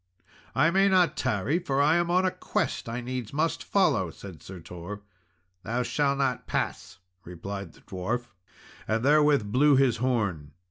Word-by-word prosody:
"I 155 +5 +4
may 195 +2 +4
not 185 -2 +3
tarry, 130 - 0
for 140 -6 -1
I 150 +4 +4
am 175 0 0
on 180 +2 +3
a 185 - +2
quest - - -2
I 120 +2 -3
needs 125 -2 -5
must 160 +3 0
follow," 150 - +2
said 90 0 -11
Sir 95 -1 -10
Tor. 90 +5 -8 0.6
"Thou 120 +5 -2
shalt 140 +2 0
not 135 -3 -1
pass," - - -3 0.3
replied 95 +1 -7
the - - -20
dwarf, 110 +7 -3 0.6
and 110 +3 0
therewith 145 -7 +4
blew 145 +4 +5
his 130 -4 +3
horn. 100 - -1
125 Hz, 165 wpm, -27 LUFS, 100-150 Hz, 0.6 s, blew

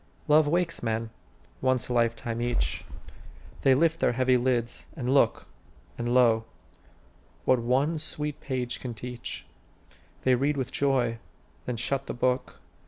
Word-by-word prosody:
Love 150 0 +5
wakes 170 +2 0
men, 115 -1 -2 0.5
once 130 -1 +1
a 125 - -2
lifetime 115 0 0
each; 120 - -1 0.8
They 135 -1 +5
lift 165 +3 +2
their - - +2
heavy 130 +1 +3
lids, 120 -2 0
and 130 -1 0
look; 120 -5 +3 0.5
And, 120 0 -2
lo, 115 -3 +4 1.0
what 130 - +4
one 135 +7 +1
sweet 150 -1 -4
page 125 -2 -3
can 120 -3 -6
teach, 120 +2 -6 0.8
They 130 - +4
read 140 +4 +1
with 130 -1 -2
joy, 125 -5 +1 0.5
then 125 -2 -2
shut 135 +4 -1
the - - -4
book. 125 +1 -1
125 Hz, 140 wpm, -28 LUFS, 120-140 Hz, 1.0 s, Love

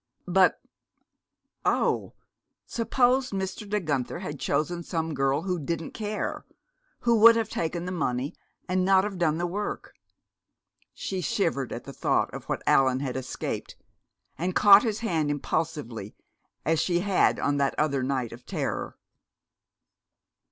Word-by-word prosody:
But, 180 0 +4 1.0
oh! - - +1 0.5
suppose 250 +2 +2
Mr. 195 +1 -4
De 210 +1 +1
Guenther 145 -6 -2
had 150 -6 -5
chosen 170 +3 -1
some 165 -2 -3
girl 135 +2 +1
who 180 -2 -1
didn't 165 +2 -3
care, 215 -1 -3 0.6
who 235 -2 +3
would 230 +2 +9
have 225 -2 0
taken 170 -1 -2
the 180 - -3
money 135 -6 -1 0.3
and 185 0 +1
not 190 0 +5
have 195 -3 -4
done 160 -2 +2
the 175 - -1
work! 205 +4 -4 1.0
She 190 -1 -3
shivered 160 - -1
at - - -5
the - - -9
thought - - 0
of - - -7
what - - -3
Allan 130 -1 +4
had 130 -3 -3
escaped, 130 0 -4 0.6
and 180 +2 -1
caught 205 0 +8
his 220 -2 -2
hand 165 -9 0
impulsively, 145 -7 -3 0.5
as 160 0 +2
she 175 -1 +1
had 195 -1 +2
on 145 0 +1
that 140 -1 +1
other 140 -3 +1
night 130 -3 -1
of 120 +1 -11
terror. - - -3
170 Hz, 145 wpm, -27 LUFS, 140-195 Hz, 1.0 s, would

